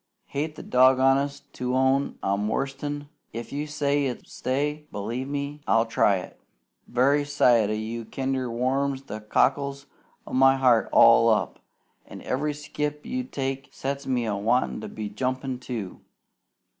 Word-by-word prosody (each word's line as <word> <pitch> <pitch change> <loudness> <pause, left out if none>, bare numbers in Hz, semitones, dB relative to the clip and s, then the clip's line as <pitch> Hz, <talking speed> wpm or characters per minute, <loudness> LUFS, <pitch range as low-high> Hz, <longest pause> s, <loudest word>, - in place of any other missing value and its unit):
Hate 150 +2 -3
the - - -9
doggondest 135 +2 +3
to 125 0 -2
own 130 +1 +2
I'm 100 +2 0
worsted, 135 +5 -2 0.2
an' 145 - -17 0.2
if 115 +3 -6
you 145 +2 -3
say 145 -1 0
it's 125 - -7
stay, 150 +3 -2
b'lieve 135 +7 -4
I'll 115 0 +4
try 110 -3 +3
it. 90 - -8 0.5
Very 140 +4 +3
sight 125 -7 +3
o' - - 0
you 110 +2 -4
kinder 130 +1 -2
warms 135 +3 -1
the 110 -4 -7
cockles 140 +5 +1 0.4
o' - - -10
my 135 +1 +5
heart 125 -4 +3
all 115 0 +7
up, 110 -1 0 0.5
an' - - -10
every 145 +3 -1
skip 150 0 -4
you 255 0 -2
take 135 - -4
sets 140 +1 -4
me 125 -3 0
a 105 -2 -1
wantin' 105 - 0
to - - -6
be 105 -1 -5
jumpin', 130 +4 -3
too. 115 -7 -6
130 Hz, 155 wpm, -26 LUFS, 115-140 Hz, 0.5 s, all